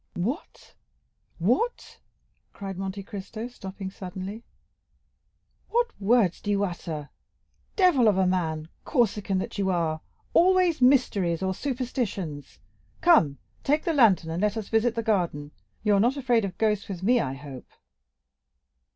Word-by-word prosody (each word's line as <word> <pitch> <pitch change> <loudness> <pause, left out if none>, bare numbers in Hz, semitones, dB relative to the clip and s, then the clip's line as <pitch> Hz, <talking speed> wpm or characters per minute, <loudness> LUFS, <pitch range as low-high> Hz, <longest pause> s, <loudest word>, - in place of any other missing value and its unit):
"What, 245 - -4 0.6
what!" 245 - -1 0.5
cried 195 -2 -6
Monte 195 +1 -4
Cristo, 205 +4 -6
stopping 190 -5 -8
suddenly, 190 +4 -7 1.3
"what 475 0 +1
words 200 -4 +3
do 205 - -5
you 205 0 +2
utter? 165 -5 -5 0.6
Devil 350 - +4
of 205 -3 +4
a 190 - +3
man, 160 -4 -1
Corsican 210 -7 +1
that 185 +2 -4
you 195 -1 +1
are—always 310 - +1
mysteries 200 - +3
or 190 0 0
superstitions. 225 - -4 0.4
Come, 165 - +5 0.3
take 300 +2 +2
the 335 - 0
lantern, 200 - +4
and 170 +3 -2
let 210 +1 +1
us 220 - -5
visit 225 +1 +2
the 230 - -1
garden; 170 -9 0 0.3
you 210 -1 +3
are 200 - +4
not 245 +7 +2
afraid 240 -5 +2
of 185 -2 -6
ghosts 210 -2 +1
with 185 -2 -6
me, 240 +4 +4
I 135 - -2
hope?" 135 -2 -10
200 Hz, 135 wpm, -26 LUFS, 180-245 Hz, 1.3 s, Come